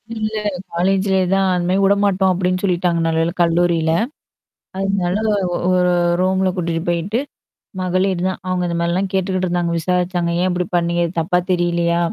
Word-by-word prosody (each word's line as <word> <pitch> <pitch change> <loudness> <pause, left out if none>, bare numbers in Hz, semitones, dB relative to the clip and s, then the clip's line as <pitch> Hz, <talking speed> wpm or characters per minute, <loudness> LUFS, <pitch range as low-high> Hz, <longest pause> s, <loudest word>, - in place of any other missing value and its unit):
இல்ல 215 0 -3 0.4
காலேஜ்லயே 190 +2 +1
தான் 195 0 +2
அந்த 175 -1 -1
மாரி 190 +2 +2
விடமாட்டோம் 195 -1 +3
அப்டின்னு 185 0 -1
சொல்லிட்டாங்க 175 -2 +1
நல்ல 165 0 0
வேலை 165 +1 -1
கல்லூரில. 170 -1 +2 0.9
அதனால 195 -2 0 0.5
ஒரு 180 -1 +3 0.3
ரூம்ல 190 0 +2
கூட்டிட்டு 170 -2 -2
போயிட்டு, 175 +7 0 0.6
மகளீர் 185 0 0
தான் 185 - -3
அவுங்க 185 -1 -1
இந்த 170 -1 -2
மாரிலாம் 180 +3 0
கேட்டுக்கிட்டு 185 -1 0
இருந்தாங்க. 175 -1 -1
விசாரிச்சாங்க. 180 0 0
"ஏன் 185 - +2
இப்படி 180 0 -1
பண்ணீங்கது 170 -1 0
தப்பா 175 +2 +1
தெரியலையா? 170 -1 +1
180 Hz, 145 wpm, -19 LUFS, 170-190 Hz, 0.9 s, விடமாட்டோம்